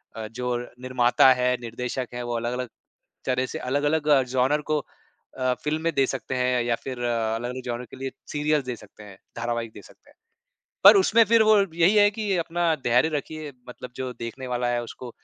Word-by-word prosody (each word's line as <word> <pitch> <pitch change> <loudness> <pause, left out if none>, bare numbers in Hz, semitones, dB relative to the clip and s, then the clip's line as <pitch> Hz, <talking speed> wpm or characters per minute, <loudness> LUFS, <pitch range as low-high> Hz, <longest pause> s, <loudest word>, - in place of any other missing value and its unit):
अ, 110 -1 -5
जो 125 +2 -3 0.3
निर्माता 130 0 +4
है, 125 0 +1
निर्देशक 125 +2 -4
है, 120 0 -4
वो 120 0 -3
अलग-अलग 125 +1 -3 0.6
तरह 130 0 0
से 160 - -6
अलग-अलग 145 +3 0
अ, 145 -3 +5
जॉन्रा 130 +3 +1
को 150 - +2 0.6
अ, 130 -1 +1
फ़िल्में 160 +2 -1
दे 135 -1 +4
सकते 130 0 -4
हैं 125 -1 +1
या 120 0 +1
फिर 130 -2 -6
अ, 115 -2 0
अलग-अलग 125 +3 -4
जॉन्रा 120 0 -4
के - - -10
लिए 135 0 -4 0.2
सिरियल्स 150 -2 0
दे 125 - -3
सकते 105 -1 -15
हैं, 100 -2 -13 0.2
धारावाहिक 120 -1 -3
दे - - -11
सकते - - -20
हैं। - - -23 0.7
पर - - +10
उसमें 230 - +5
फिर 225 +1 +4
वो 215 0 +5 0.2
यही 175 +4 +4
है 205 0 +6
कि 210 -3 -2
अपना 170 0 0
धैर्य 125 +6 +3
रखिए, 155 0 -6 0.2
मतलब 125 0 -9
जो 130 -1 -4
देखने 130 +3 -6
वाला 125 -1 -1
है, 120 0 -1
उसको 120 +1 -9
125 Hz, 195 wpm, -25 LUFS, 120-150 Hz, 0.7 s, पर